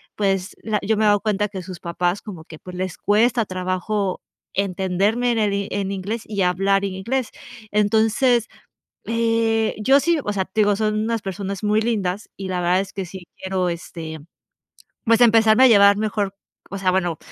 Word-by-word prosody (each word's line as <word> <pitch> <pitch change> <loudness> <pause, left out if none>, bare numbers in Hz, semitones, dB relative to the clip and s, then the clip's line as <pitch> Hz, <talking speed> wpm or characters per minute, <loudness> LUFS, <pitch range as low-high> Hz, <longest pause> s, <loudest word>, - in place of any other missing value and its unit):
pues 195 -2 -1
la 215 -2 0
yo 220 +2 +1
me 215 - 0
he - - +4
dado 205 0 +4
cuenta, 210 -1 -1
que 190 -2 -6
sus 180 0 -9
papás 175 +2 -1
como 180 -7 -9
que 160 -1 -12
pues, 180 -1 -9
les 185 -2 -3
cuesta 230 +3 +2
trabajo 185 +1 -2 0.3
entenderme 195 +5 0
en 225 - 0
el 205 -2 +1
i 200 0 -2
en 195 -1 -2
inglés, 200 +4 -3
y 200 -3 -1
hablar 195 +2 +2
en 195 - -3
inglés. 235 +7 -2 0.4
Entonces, 220 +3 +2 0.6
eh, 225 -1 +1
yo 270 +6 +5
sí 335 +2 +2
O 205 - -2
sea, 195 -2 -1
te 215 +4 0
digo, 205 -1 +3
son 215 0 0
unas 225 0 -1
personas 195 0 -5
muy 210 +1 +2
lindas 210 -3 -2
y 195 - -5
la 180 -1 -2
verdad, 180 +1 +2
es 195 0 -4
que 195 - -3
sí 180 0 -10
quiero, 190 -1 -2
este, 165 -2 -6 0.9
pues, 230 0 +4
empezarme 225 +1 +6
a - - +9
llevar 200 -3 +6
mejor, 205 -2 -2 0.3
o 195 - -5
sea, 190 -1 +1
bueno, 175 -3 0
200 Hz, 190 wpm, -22 LUFS, 185-220 Hz, 0.9 s, a